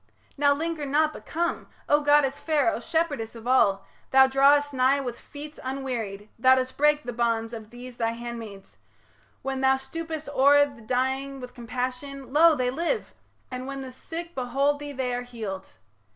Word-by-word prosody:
Now 285 0 +3
linger 325 0 -3
not, 305 +2 +2
but - - -12
come! 340 +2 -2 0.2
O 295 +1 +4
goddess 290 -1 +3
fair, 290 -7 +2
O - - -3
shepherdess 285 -6 -1
of 230 0 -10
all, 200 -6 +3 0.2
thou 265 0 +7
drawest 280 +2 +4
nigh 265 +2 +3
With 245 -3 -5
feet 300 +1 -10
unwearied... 245 -7 -4
Thou 260 +2 +6
dost 260 0 -2
break 300 +1 +3
the 245 - -5
bonds 230 -1 0
Of 220 -2 -8
these 245 +1 -10
thy 230 0 0
handmaids... 230 -4 -8 0.7
When 270 0 -2
thou 265 0 +5
stoopest 315 +3 -6
o'er 285 +1 +5
The 275 -5 -12
dying 265 +4 -1
with 250 -1 -9
compassion, 255 +3 -5
lo! 325 +1 +6
they 250 -2 0
live; 340 - -2 0.4
And 255 +1 -5
when 275 0 -5
the 260 - -8
sick 335 +6 -7
behold 275 +3 0
thee 290 0 -6
they 260 -2 -2
are 245 - -1
healed. 220 -6 -6
265 Hz, 175 wpm, -26 LUFS, 245-290 Hz, 0.7 s, thou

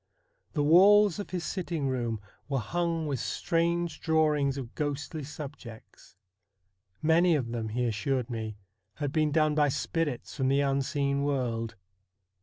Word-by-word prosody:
The 145 - +1
walls 200 +5 +6
of 205 - -5
his 180 -2 -3
sitting 170 -7 -2
room 120 -4 -2 0.3
were 135 - 0
hung 165 +5 -1
with 140 -4 -2
strange 170 +2 0
drawings 150 -4 +2
of 125 -4 -6
ghostly 145 +1 -3
subjects. 135 -9 -10 0.9
Many 165 +2 +4
of 125 -6 -1
them, 115 -2 -3
he 120 +3 -1
assured 120 +3 -1
me, 110 -3 -5 0.4
had 145 -3 -3
been 155 0 +1
done 155 0 +3
by 150 -1 +3
spirits 145 -1 -2
from 130 -2 0
the 135 +1 +3
unseen 140 0 0
world. 120 -5 -1
145 Hz, 140 wpm, -29 LUFS, 130-160 Hz, 0.9 s, walls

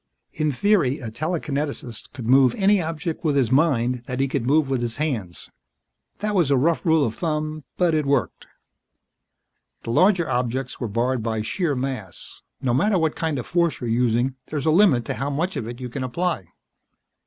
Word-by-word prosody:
In 155 -1 0
theory, 150 -4 +2
a 115 -4 -7
telekineticist 145 - -3
could 120 - -8
move 130 0 +5
any 200 0 +4
object 165 +1 -4
with 150 -3 +1
his 130 -4 +2
mind 125 -4 +2
that 125 +1 -4
he 135 - +2
could 130 -3 -2
move 150 +1 +3
with 135 -2 -1
his 115 -1 -3
hands. 120 - -3 0.7
That 210 0 -1
was 175 -8 +2
a 140 - +4
rough 165 +6 +1
rule 160 -3 +4
of 110 - -2
thumb, 155 -1 -3
but 175 -2 +2
it 155 -2 +1
worked. 140 -3 0 1.4
The 115 - -4
larger 175 - +3
objects 125 +1 -2
were 120 - -2
barred 120 +4 0
by 110 -1 -2
sheer 160 - -1
mass; 125 -8 -5 0.2
no 125 -2 +1
matter 195 - +2
what 160 -2 0
kind 160 -3 -1
of 125 - -4
force 170 -2 +1
you're 120 -3 -3
using, 120 +2 +1
there's 145 -3 -3
a 160 - +4
limit 155 - +4
to - - -2
how 135 +2 -3
much 165 +7 -2
of 110 - -3
it 120 +1 -7
you 125 - -5
can 130 +2 -5
apply. 130 - -2
140 Hz, 190 wpm, -23 LUFS, 120-160 Hz, 1.4 s, move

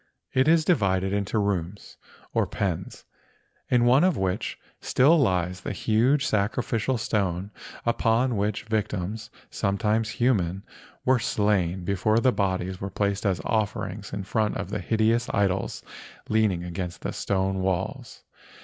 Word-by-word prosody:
It 130 +2 +3
is 160 -1 +4
di¬ 180 - +5
vided 95 - 0
into 100 +2 -1
rooms 100 -2 -2 0.4
or - - +1
pens, 95 -3 -3 0.6
in 120 -1 +4
one 130 +5 +5
of 185 -1 +3
which 95 +1 -2 0.2
still 145 +6 +4
lies 90 - +1
the - - -4
huge 125 +6 +2
sacrificial 110 +4 0
stone 100 -3 -1 0.3
upon 115 +1 +2
which 105 +1 -1
victims 110 -1 -3 0.2
—sometimes 110 +3 0
human—were 120 +2 0
slain 95 -5 0
before 100 +4 +1
the 130 +2 +4
bodies 95 -3 -1
were 95 - -3
placed 100 +2 -1
as 95 -2 0
offerings 105 -2 -2
in 100 - -4
front 105 +2 0
of - - -5
the 105 - -2
hideous 110 +5 +1
idols 95 -2 0 0.5
leaning 105 -5 +2
against 90 0 -5
the - - -3
stone 95 -1 -1
walls. 95 0 -3
100 Hz, 135 wpm, -26 LUFS, 95-115 Hz, 0.6 s, di¬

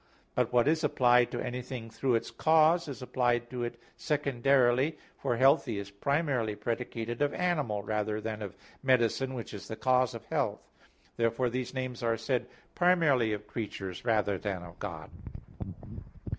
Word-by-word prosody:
But 125 -1 +1
what 120 +1 +4
is 160 +1 +2
applied 125 -4 +4
to - - -4
anything 125 -2 -5
through 125 +2 +1
its 115 - -2
cause, 160 +2 +4
is 140 -2 -6
applied 120 -2 0
to 125 -1 -3
it 120 0 -4 0.2
secondarily, 140 0 +2 0.2
for 120 - 0
"healthy" 135 -3 +4
is 100 0 -6
primarily 130 -1 0
predicated 115 +2 -3
of 145 0 +1
animal 150 - 0
rather 105 +1 -1
than 110 0 -4
of 100 -3 -6 0.3
medicine, 130 0 +2
which 115 -2 -6
is 100 - -8
the 110 - -5
cause 130 0 +2
of - - -8
health. - - -2 0.5
Therefore 115 +1 +1
these 130 +1 -3
names 130 -2 -3
are 115 -1 +1
said 125 +3 -1 0.3
primarily 160 -11 +3
of 105 0 -3
creatures 100 -4 -5
rather 105 -5 +1
than 95 -3 -3
of 85 -1 -12
God. - - -6
120 Hz, 155 wpm, -30 LUFS, 110-135 Hz, 0.5 s, what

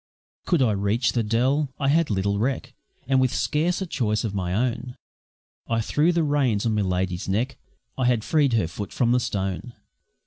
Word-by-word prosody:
Could 170 -7 +3
I 115 - +3
reach 100 +4 +1
the 120 - 0
Dell? 130 +7 +1
I 135 -1 +1
had 165 +2 +3
little 100 0 0
reck, 130 +4 -2 0.3
And 130 0 +3
with 130 -1 +2
scarce 170 +8 0
a - - -3
choice 110 - -1
of 110 -4 -2
my 90 -3 -2
own 120 +4 -1 0.7
I 115 -1 0
threw 150 +9 +2
the 170 -1 +1
reins 135 -8 +1
on 115 - +1
Miladi's 95 -2 -1
neck 115 +8 -1 0.4
I 130 - +2
had 120 -3 +2
freed 145 -4 +2
her 110 -7 +2
foot 100 +4 -6
from 120 -2 +1
the 125 - +4
stone. 95 -1 -3
120 Hz, 185 wpm, -24 LUFS, 100-135 Hz, 0.7 s, the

